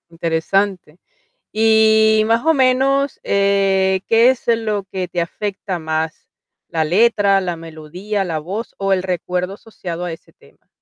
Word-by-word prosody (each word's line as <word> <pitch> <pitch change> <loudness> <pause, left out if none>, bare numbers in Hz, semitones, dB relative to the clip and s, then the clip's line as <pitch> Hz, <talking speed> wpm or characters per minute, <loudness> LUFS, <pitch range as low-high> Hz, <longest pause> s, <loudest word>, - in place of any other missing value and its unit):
Interesante. 170 +1 -1 0.5
Y, 220 0 +4
más 230 +4 +1
o 320 - +4
menos, 270 +1 +2
eh, 195 -1 +1
¿qué 230 +3 +5
es, 260 - -4
eh, 230 - +4
lo 210 -3 -3
que 185 -2 -3
te 175 - -3
afecta 190 +1 -4
más? 160 0 -4 0.4
¿La 160 -1 -1
letra, 200 +2 +3
la 175 -2 -3
melodía, 165 +6 -5
la 165 -3 -3
voz 195 +9 -6
o 195 0 0
el 185 -1 +1
recuerdo 180 +1 -3
asociado 180 -5 -7
a 175 - -4
ese 165 - -13
tema? - - -25
195 Hz, 150 wpm, -18 LUFS, 175-220 Hz, 0.5 s, qué